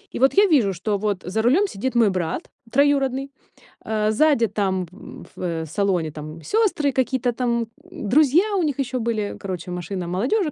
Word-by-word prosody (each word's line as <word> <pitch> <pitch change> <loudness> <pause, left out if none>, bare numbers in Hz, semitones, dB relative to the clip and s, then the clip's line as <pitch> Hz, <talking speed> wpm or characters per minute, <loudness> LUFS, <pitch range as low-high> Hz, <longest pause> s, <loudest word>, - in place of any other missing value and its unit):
и - - -3
вот 265 +2 +4
я 405 +1 +6
вижу, 250 - +3
что 200 +4 -1
вот 205 -2 -1
за 195 +5 -1
рулем 290 - +3
сидит 260 - -4
мой 230 -3 +5
брат 180 -4 -3 0.2
троюродный, 275 -1 +2 0.5
э, 215 -1 0
сзади 235 0 +3
там 190 -3 -1 0.5
в, - - -10
э, 165 -3 -2
салоне 175 -1 0
там 155 +2 -8
сёстры, 390 - +1
какие-то 260 -1 0
там 235 -1 -1 0.2
друзья 310 - +3
у 365 - +1
них 290 -3 -1
ещё 260 -1 -1
были, 220 -3 -2
короче, 180 -2 -6
машина 180 +1 -4
молодёжи 265 - 0
230 Hz, 170 wpm, -22 LUFS, 190-275 Hz, 0.5 s, я